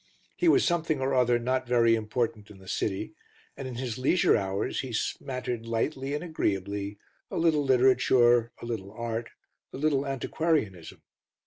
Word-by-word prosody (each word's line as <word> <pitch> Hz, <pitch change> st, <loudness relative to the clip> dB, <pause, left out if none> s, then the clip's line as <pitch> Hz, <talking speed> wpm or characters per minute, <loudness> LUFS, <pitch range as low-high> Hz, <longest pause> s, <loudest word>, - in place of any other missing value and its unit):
He 355 Hz, -, +1 dB
was 330 Hz, -, +5 dB
something 165 Hz, -4 st, 0 dB
or 135 Hz, +1 st, 0 dB
other 125 Hz, -2 st, +3 dB
not 130 Hz, +2 st, -1 dB
very 120 Hz, -1 st, +4 dB
important 110 Hz, -1 st, -2 dB
in 105 Hz, -, -13 dB
the 95 Hz, 0 st, -16 dB
City, 95 Hz, 0 st, -2 dB, 0.4 s
and 135 Hz, -, -6 dB
in 125 Hz, -, -6 dB
his 125 Hz, -2 st, -4 dB
leisure 155 Hz, +8 st, +3 dB
hours 95 Hz, -1 st, -1 dB
he 130 Hz, -, -4 dB
smattered 125 Hz, 0 st, -3 dB
lightly 135 Hz, +4 st, -1 dB
and 150 Hz, -, -4 dB
agreeably 100 Hz, -, -2 dB, 0.3 s
a -, -, -4 dB
little 160 Hz, -3 st, +3 dB
literature, 125 Hz, -2 st, +4 dB
a -, -, -8 dB
little 105 Hz, -5 st, -5 dB
art, 115 Hz, 0 st, -4 dB, 0.4 s
a -, -, -7 dB
little 140 Hz, -1 st, +1 dB
antiquarianism. 135 Hz, -, -2 dB
125 Hz, 155 wpm, -28 LUFS, 110-135 Hz, 0.4 s, was